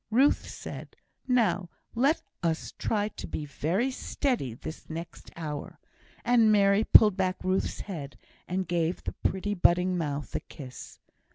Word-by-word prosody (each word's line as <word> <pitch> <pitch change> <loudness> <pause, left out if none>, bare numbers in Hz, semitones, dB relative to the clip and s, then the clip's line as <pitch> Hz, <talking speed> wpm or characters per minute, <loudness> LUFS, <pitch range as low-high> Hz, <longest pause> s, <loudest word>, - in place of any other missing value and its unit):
Ruth 260 +6 +3
said, - - -8 0.3
"Now, 210 -8 +2 0.2
do 230 - -6
let 290 +5 +3 0.2
us 165 -2 -1
try 210 -1 0
to - - -8
be 150 - -4
very 180 - 0
steady 245 - -1
this 155 - -9
next 165 +1 -7
hour," 150 -3 -5 0.5
and 235 -3 +5
Mary 200 0 +5
pulled 210 -3 +7
back 185 -1 0
Ruth's 185 +1 0
head, 145 -10 -7 0.3
and 185 0 -1
gave 170 0 0
the - - -3
pretty 200 +2 -1
budding 180 -1 +3
mouth 145 -2 -3
a - - 0
kiss. 130 -3 -10
185 Hz, 150 wpm, -28 LUFS, 160-215 Hz, 0.5 s, pulled